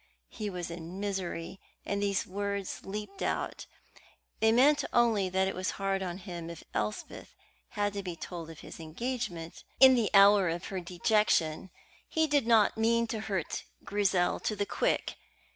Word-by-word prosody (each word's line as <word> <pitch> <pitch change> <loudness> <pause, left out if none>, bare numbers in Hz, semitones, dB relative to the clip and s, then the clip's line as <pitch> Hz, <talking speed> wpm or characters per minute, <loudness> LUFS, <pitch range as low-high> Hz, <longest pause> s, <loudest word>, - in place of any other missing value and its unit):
He 215 -2 -4
was 180 -3 -5
in 170 +2 -7
misery, 190 -3 -4 0.3
and 200 0 -1
these 200 -1 0
words 200 0 -3
leaped 200 0 -6
out. - - -2 0.7
They 220 0 +4
meant 285 +5 +5
only 225 -5 +3
that 190 +1 +1
it 190 - -2
was 185 +1 -2
hard 195 -1 0
on 180 -2 -3
him 175 -4 -7
if 170 - -9
Elspeth 105 0 -4 0.4
had 205 0 +1
to 200 - -3
be 180 -3 -5
told 165 0 -7
of 160 - -11
his - - -10
engagement 175 0 -4 0.2
in 265 -1 +9
the 235 -5 +2
hour 195 -2 +7
of 170 +1 -3
her 190 - -3
dejection. 180 -2 +1 0.4
He 320 0 +2
did 285 -5 +1
not 220 -2 +4
mean 230 +1 +3
to 220 - -2
hurt 195 -6 -3 0.2
Grizel 195 -3 +1
to 215 - -2
the 205 0 -1
quick. - - -1
195 Hz, 165 wpm, -30 LUFS, 175-215 Hz, 0.7 s, in